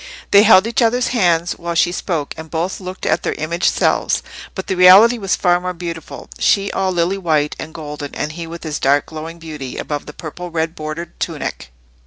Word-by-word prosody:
They 200 Hz, -, +8 dB
held 210 Hz, -2 st, +6 dB
each 230 Hz, +2 st, 0 dB
other's 240 Hz, +2 st, +2 dB
hands 175 Hz, -7 st, +1 dB
while 170 Hz, 0 st, -4 dB
she 175 Hz, +1 st, +3 dB
spoke, 165 Hz, -5 st, -3 dB
and 160 Hz, 0 st, -9 dB
both 170 Hz, +4 st, -2 dB
looked 185 Hz, 0 st, -7 dB
at -, -, +1 dB
their -, -, -2 dB
imaged 170 Hz, +3 st, 0 dB
selves. -, -, +1 dB, 0.3 s
But 190 Hz, -, -4 dB
the -, -, -1 dB
reality 190 Hz, +6 st, +7 dB
was 195 Hz, -3 st, 0 dB
far 175 Hz, -1 st, +2 dB
more 180 Hz, 0 st, -4 dB
beautiful; 165 Hz, -2 st, -7 dB
she 200 Hz, 0 st, +2 dB
all 190 Hz, -1 st, 0 dB
lily 180 Hz, +2 st, 0 dB
white 155 Hz, -5 st, +1 dB
and 155 Hz, -, -6 dB
golden, 150 Hz, -3 st, -7 dB
and 150 Hz, -, -3 dB
he 165 Hz, +1 st, -7 dB
with 170 Hz, +1 st, -8 dB
his 155 Hz, -2 st, -3 dB
dark 140 Hz, +2 st, +3 dB
glowing 160 Hz, +1 st, -8 dB
beauty 150 Hz, -6 st, -7 dB
above 145 Hz, -1 st, -4 dB
the 150 Hz, -, -8 dB
purple 175 Hz, +4 st, -7 dB
red 165 Hz, -1 st, -2 dB
bordered 155 Hz, +1 st, -7 dB
tunic. -, -, -4 dB
170 Hz, 205 wpm, -18 LUFS, 155-185 Hz, 0.3 s, They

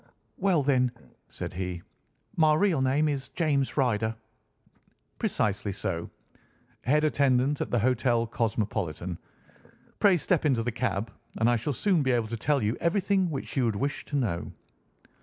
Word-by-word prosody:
"Well 185 Hz, -6 st, +2 dB
then," 130 Hz, -3 st, +2 dB, 0.4 s
said -, -, -6 dB
he, 90 Hz, -1 st, -4 dB, 0.5 s
"my 155 Hz, -2 st, +4 dB
real 170 Hz, -4 st, +2 dB
name 135 Hz, +4 st, +2 dB
is 135 Hz, -3 st, -2 dB
James 145 Hz, -6 st, 0 dB
Ryder." 115 Hz, -4 st, +1 dB, 1.0 s
"Precisely 105 Hz, 0 st, 0 dB
so. 90 Hz, -3 st, -3 dB, 0.8 s
Head 150 Hz, +5 st, +3 dB
attendant 140 Hz, -2 st, +2 dB
at -, -, -2 dB
the 120 Hz, -, +1 dB
Hotel 120 Hz, 0 st, +2 dB
Cosmopolitan. 100 Hz, -7 st, -2 dB, 0.8 s
Pray 195 Hz, -3 st, +5 dB
step 175 Hz, +1 st, +1 dB
into 130 Hz, -7 st, +2 dB
the 120 Hz, -, -1 dB
cab, 110 Hz, -3 st, -2 dB, 0.3 s
and 110 Hz, -, +2 dB
I 120 Hz, -, +4 dB
shall 120 Hz, +6 st, -2 dB
soon 180 Hz, -, +2 dB
be 130 Hz, -2 st, +2 dB
able 115 Hz, -2 st, 0 dB
to 115 Hz, -, -3 dB
tell 140 Hz, +2 st, +1 dB
you 105 Hz, +3 st, 0 dB
everything 190 Hz, +1 st, +1 dB
which 140 Hz, -4 st, -5 dB
you 130 Hz, -3 st, +2 dB
would 110 Hz, -3 st, 0 dB
wish 140 Hz, +7 st, -2 dB
to 145 Hz, -, -5 dB
know." 105 Hz, -11 st, -1 dB
130 Hz, 155 wpm, -28 LUFS, 110-150 Hz, 1.0 s, Pray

